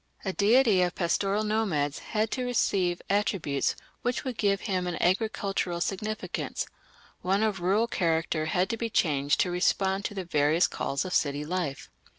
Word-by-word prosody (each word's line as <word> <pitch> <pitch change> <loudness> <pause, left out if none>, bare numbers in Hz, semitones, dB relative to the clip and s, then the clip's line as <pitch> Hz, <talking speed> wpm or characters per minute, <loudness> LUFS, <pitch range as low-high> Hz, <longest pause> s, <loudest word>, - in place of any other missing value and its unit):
A 190 - -1
deity 215 -1 +4
of 180 -1 0
pastoral 195 +4 0
nomads 195 -10 0
had 215 0 -2
to 255 - -2
receive 190 -7 0
attributes 195 -8 0 0.3
which 245 0 -1
would 255 -2 -3
give 200 -2 +1
him 185 -3 -1
an 175 - -2
agricultural 195 -2 0
significance; 210 +4 -3 0.6
one 195 +3 +1
of 210 -4 0
rural 195 +6 +2
character 165 -6 0
had 180 +3 +1
to 230 - -2
be 230 0 -2
changed 145 -8 +1
to 180 - 0
respond 190 +2 +1
to 205 - -3
the 190 -2 -4
various 155 +1 +3
calls 140 +6 -2
of 185 - -4
city 145 0 +1
life. 170 -4 -3
190 Hz, 160 wpm, -28 LUFS, 170-210 Hz, 0.6 s, deity